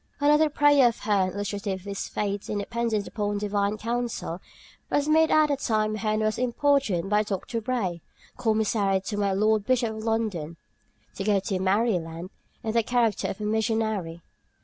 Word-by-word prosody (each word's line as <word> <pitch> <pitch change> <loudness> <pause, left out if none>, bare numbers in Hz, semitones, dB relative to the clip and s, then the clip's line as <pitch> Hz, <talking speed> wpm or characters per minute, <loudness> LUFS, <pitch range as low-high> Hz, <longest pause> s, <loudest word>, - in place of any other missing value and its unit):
Another 300 +2 +4
prayer 290 -3 +5
of 235 - -1
Hearne's, 195 -3 +1
illustrative 200 -1 -3
of - - -19
his 200 -1 -4
faith 200 -1 -3
in 210 - -1
dependence 225 0 -1
upon 205 -1 -2
Divine 205 0 -1
counsel, 230 -6 -3 0.5
was 290 0 +1
made 320 +1 +4
at 310 -1 +4
the 285 - +1
time 215 -5 0
Hearne 215 0 -1
was 215 +1 0
importuned 250 - +1
by 210 0 +4
Dr. 215 +3 -3
Bray, 205 -8 -2 0.3
commissary 215 -4 +1
to 205 +2 -4
my 200 -1 +1
Lord 215 +2 +2
Bishop 235 -1 +1
of 220 - -6
London, 210 -8 -2 0.6
"to 195 - -5
go 205 -1 +3
to 190 -1 -2
Mary 200 +2 +2
Land" 165 +3 -8 0.3
in 220 - -1
the 230 +1 +3
character 235 -2 +1
of 200 - -5
a - - -2
missionary. 220 -6 -1
215 Hz, 170 wpm, -26 LUFS, 200-235 Hz, 0.6 s, prayer